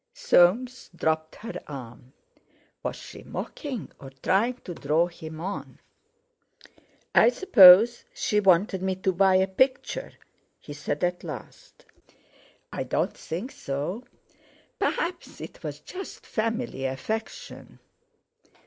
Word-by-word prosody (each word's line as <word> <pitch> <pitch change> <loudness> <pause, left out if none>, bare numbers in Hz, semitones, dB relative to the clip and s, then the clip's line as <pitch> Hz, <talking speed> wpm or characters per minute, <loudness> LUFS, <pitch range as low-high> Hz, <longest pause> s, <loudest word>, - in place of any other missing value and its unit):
Soames 255 - +3
dropped 160 -1 -1
her 230 +2 -7
arm. 125 -3 -10 0.7
Was - - -3
she - - -11
mocking, 265 - -6
or 135 - -10
trying 230 +6 +2
to 175 - -6
draw 155 +2 +1
him 160 -2 -9
on? 190 +4 -6 1.4
"I - - +7
suppose 235 - +7
she 210 - 0
wanted 190 -1 +3
me 190 0 -1
to 190 +1 0
buy 190 +1 +4
a 190 0 +4
picture," 260 - 0 0.5
he 145 - -10
said 145 +1 -4
at 175 0 -1
last. 155 -6 -10 0.9
"I - - -3
don't - - -1
think 190 - -6
so. 145 - -4 0.8
Perhaps 350 +1 -2
it - - -10
was - - -6
just 380 +1 -9
family 225 - -2
affection." 175 - -5
190 Hz, 115 wpm, -26 LUFS, 160-235 Hz, 1.4 s, I